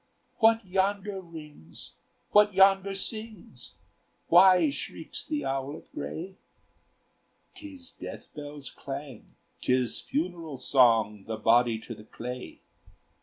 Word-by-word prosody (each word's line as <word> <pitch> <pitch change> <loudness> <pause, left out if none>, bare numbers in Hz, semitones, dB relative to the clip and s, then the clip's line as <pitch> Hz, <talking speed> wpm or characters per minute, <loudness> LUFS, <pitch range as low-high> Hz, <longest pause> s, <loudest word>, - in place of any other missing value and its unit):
"What 225 -1 +4
yonder 195 +1 -1
rings, 150 - -12 0.4
what 210 -1 +5
yonder 195 0 +5
sings? 215 - -5 0.5
Why 180 -3 +7
shrieks 150 +3 -6
the 300 -1 -3
owlet 135 +2 -4
gray?" 185 +4 -6 1.2
"'Tis 285 -4 -10
death - - -9
bells' 145 -2 -8
clang, 135 -3 -8 0.3
'tis 125 -1 +1
funeral 165 -2 -3
song, 115 -6 +3
The 110 -1 -3
body 115 +1 +3
to 115 - -8
the 105 -1 -13
clay. 125 +3 -8
155 Hz, 105 wpm, -28 LUFS, 125-195 Hz, 1.2 s, Why